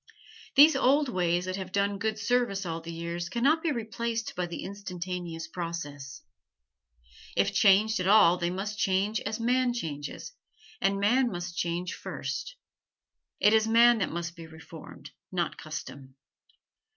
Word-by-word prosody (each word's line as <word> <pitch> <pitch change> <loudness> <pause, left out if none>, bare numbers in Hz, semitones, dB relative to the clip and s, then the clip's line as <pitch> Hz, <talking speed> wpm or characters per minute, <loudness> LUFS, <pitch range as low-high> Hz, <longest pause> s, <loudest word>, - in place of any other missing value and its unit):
These 300 +3 +8
old 280 +2 +3
ways 175 -4 0
that 185 +1 -3
have 190 -1 -6
done 200 0 0
good 220 +1 -1
service 220 -4 0
all 165 -1 -4
the 165 +1 -8
years 170 +1 -4
can 235 +5 -3
not 310 +4 +4
be 325 - 0
replaced 230 -1 -3
by 180 -1 -2
the 170 - -6
instantaneous 180 -4 -6
process. 160 -5 -6 1.1
If - - +2
changed 215 +2 +4
at 185 - -1
all 200 -4 +6
they 175 -1 -1
must 205 +3 -4
change 200 +3 +1
as 215 +2 -4
man 245 +1 +1
changes, 145 - -6 0.5
and 195 0 +1
man 245 +5 +3
must 175 -1 -5
change 175 +1 -2
first. - - -5 0.8
It 210 - +5
is 220 0 +4
man 235 +1 +6
that 185 - 0
must 170 0 -5
be 165 -1 -10
reformed, 160 0 -12 0.2
not 175 -3 -2
custom. 135 -4 -8
190 Hz, 150 wpm, -28 LUFS, 170-220 Hz, 1.1 s, These